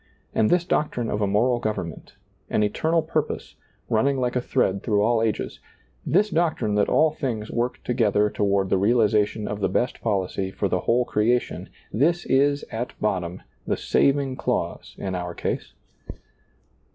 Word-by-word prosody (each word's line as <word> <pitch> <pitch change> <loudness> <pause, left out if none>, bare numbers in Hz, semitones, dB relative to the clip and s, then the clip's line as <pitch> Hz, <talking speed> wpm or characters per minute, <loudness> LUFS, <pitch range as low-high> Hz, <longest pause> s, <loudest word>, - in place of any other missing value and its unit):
And 110 - +3
this 175 -1 +3
doctrine 125 -9 -1
of 105 - -1
a 100 - +2
moral 120 +5 +2
government, 105 -8 -4 0.3
an 105 - +2
eternal 160 +10 +1
pur 155 0 +1
pose, 150 - -7 0.3
running 135 +5 +2
like 125 -1 -1
a 125 - +1
thread 95 -5 0
through 105 -3 +1
all 115 0 +2
ages; 110 -1 -2 0.5
this 205 +4 +3
doctrine 160 -10 +1
that 105 0 +2
all 155 0 +4
things 120 -8 -4
work 120 +1 -2
together 105 -4 +2
toward 100 -2 0
the 95 - +3
realization 105 0 +2
of 105 - -4
the 100 - +1
best 125 - -1
policy 95 -3 -1
for 100 +1 -2
the 90 - 0
whole 120 +6 +2
crea 115 +2 +3
tion, - - -7 0.2
this 165 +9 +2
is, 140 +2 +2
at 120 +2 -5
bottom, 90 -4 -2 0.2
the - - 0
saving 140 -2 +1
clause - - -2
in 95 -1 -4
our 90 -1 -4
case. - - -3
115 Hz, 165 wpm, -24 LUFS, 105-135 Hz, 0.5 s, all